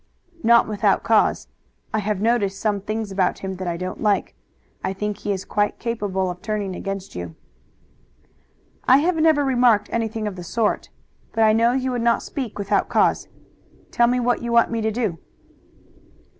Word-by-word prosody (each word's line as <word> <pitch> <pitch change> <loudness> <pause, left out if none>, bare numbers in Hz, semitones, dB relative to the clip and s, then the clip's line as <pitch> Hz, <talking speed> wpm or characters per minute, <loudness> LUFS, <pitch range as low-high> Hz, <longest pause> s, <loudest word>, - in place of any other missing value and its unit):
"Not 235 +1 +5
without 210 -2 +1
cause. - - +2 0.5
I 215 - +1
have 210 -1 -2
noticed 210 -4 +1
some 205 -2 0
things 215 +1 -4
about 190 -2 +1
him 190 -1 -4
that 185 0 -5
I 170 -1 -2
don't 185 +1 -5
like. 210 -2 +1 0.5
I 190 - -1
think 210 +1 -3
he 210 - -3
is 190 -1 -3
quite 205 0 0
capable 200 -5 -2
of 180 0 -10
turning 205 -3 -3
against 195 0 -5
you." 85 -2 -7 1.5
"I 260 - +7
have 330 +4 +1
never 310 -2 +3
remarked 245 -5 +3
anything 225 -1 -2
of 195 -3 -5
the 180 - -7
sort, 220 +4 -1 0.4
but 225 - +2
I 215 0 +5
know 230 +2 +3
you 260 0 -1
would 245 -1 -2
not 235 0 +2
speak 260 -7 -5
without 200 -1 0
cause. - - +2 0.6
Tell 235 - +3
me 250 +1 +1
what 245 0 +1
you 235 0 -3
want 235 0 +4
me 230 -1 -1
to 220 - +1
do." 215 -8 -2
215 Hz, 180 wpm, -22 LUFS, 195-235 Hz, 1.5 s, I